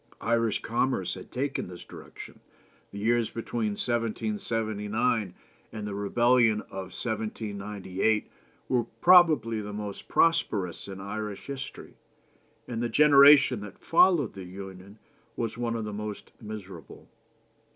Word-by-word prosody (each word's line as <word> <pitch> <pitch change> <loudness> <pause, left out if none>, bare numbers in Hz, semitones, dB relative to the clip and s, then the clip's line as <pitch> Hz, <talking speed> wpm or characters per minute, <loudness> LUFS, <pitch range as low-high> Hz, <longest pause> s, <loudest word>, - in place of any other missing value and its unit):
Irish 115 -2 +1
commerce 120 -5 0
had 95 - -10
taken 135 +2 -2
this 90 -1 -10
direction; - - -11 0.5
the 100 - -10
years 115 +2 +1
between 115 -2 -3
1779 110 -2 -1 0.4
and 105 -2 -6
the 105 - -4
rebellion 115 +2 +3
of 95 -1 -8
1798 105 -2 -2 0.4
were 125 -2 +1
probably 155 -12 +5
the 105 0 -6
most 105 -1 -6
prosperous 100 - +1
in 95 -1 -8
Irish 105 +1 -5
history, 135 -1 -8 0.7
and 115 -1 -4
the 120 - -1
generation 140 -3 +7
that 105 -2 -9
followed 165 - +3
the 95 -1 -8
Union 95 +2 -10 0.4
was 115 -2 -3
one 115 -1 -2
of 115 -1 -3
the 105 - -5
most 105 0 -6
miserable. 100 -7 -9
110 Hz, 120 wpm, -28 LUFS, 100-120 Hz, 0.7 s, generation